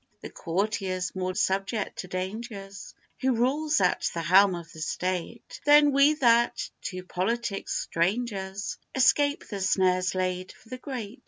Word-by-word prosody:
The - - -8
courtier's 185 -1 -2
more 185 -1 -3
subject 195 +1 -1
to 185 - -5
dangers, 195 +2 -6 0.2
Who 260 -1 +1
rules 295 +6 +1
at 180 -1 +1
the 170 - -2
helm 190 +3 +5
of 170 -1 -9
the 160 - -10
state, 185 +6 -4
Than 295 0 +6
we 280 +2 +5
that, 235 -4 +2
to 185 -1 -5
politics 195 +3 -2
strangers, 195 +1 -2 0.2
Escape 285 +3 +3
the 200 -3 -5
snares 185 -1 +2
laid 185 0 -2
for 225 - -21
the 255 0 -7
great. 245 -3 -6
195 Hz, 145 wpm, -27 LUFS, 185-240 Hz, 0.2 s, Than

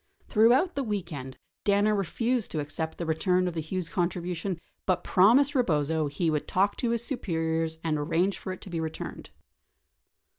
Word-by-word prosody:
Throughout 245 - +4
the 280 - -1
weekend, 170 - -4 0.3
Danner 205 +1 +3
refused 230 +4 0
to 155 - -3
accept 160 +2 -4
the 170 - -3
return 180 +3 +1
of 180 - -2
the 165 - -3
Hughes 175 +2 -3
contribution 175 +1 -2 0.3
but 185 -2 +1
promised 245 +10 +5
Eebozo 160 - +1
he 160 +3 0
would 150 -1 -1
talk 195 +2 +2
to 240 - 0
his 235 0 +1
superiors 165 - -1
and 155 -2 0
arrange 170 +6 +1
for 185 - -5
it 185 - -7
to - - -9
be 165 - -2
returned. 160 -1 -5
180 Hz, 170 wpm, -28 LUFS, 160-205 Hz, 0.3 s, promised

